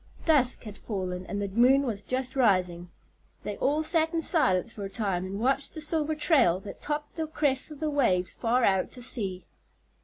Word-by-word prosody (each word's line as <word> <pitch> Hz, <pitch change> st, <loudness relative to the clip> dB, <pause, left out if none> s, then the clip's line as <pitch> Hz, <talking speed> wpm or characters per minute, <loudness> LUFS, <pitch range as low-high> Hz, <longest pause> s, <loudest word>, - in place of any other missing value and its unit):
Dusk 275 Hz, -6 st, +3 dB
had 215 Hz, -3 st, -9 dB
fallen 185 Hz, -3 st, -4 dB
and 205 Hz, -, -3 dB
the 200 Hz, -, -2 dB
moon 250 Hz, +7 st, +4 dB
was 220 Hz, -6 st, -3 dB
just 255 Hz, +3 st, -3 dB
rising. 180 Hz, -8 st, +1 dB, 0.5 s
They 205 Hz, -, -4 dB
all 300 Hz, +3 st, +1 dB
sat 320 Hz, 0 st, +1 dB
in 325 Hz, -, 0 dB
silence 230 Hz, -, +2 dB
for 205 Hz, -, -7 dB
a 195 Hz, -, -4 dB
time 195 Hz, -4 st, -2 dB
and 195 Hz, +2 st, -5 dB
watched 270 Hz, +4 st, 0 dB
the -, -, -5 dB
silver 310 Hz, 0 st, 0 dB
trail 275 Hz, -, +3 dB
that 200 Hz, 0 st, -10 dB
topped 300 Hz, +2 st, -4 dB
the 320 Hz, -1 st, -2 dB
crests 290 Hz, -3 st, 0 dB
of 300 Hz, -2 st, -10 dB
the 310 Hz, -1 st, -1 dB
waves 185 Hz, -11 st, +1 dB
far 240 Hz, +2 st, +1 dB
out 190 Hz, -3 st, +2 dB
to 250 Hz, -, -6 dB
sea. 195 Hz, -7 st, -2 dB
245 Hz, 195 wpm, -27 LUFS, 195-295 Hz, 0.5 s, moon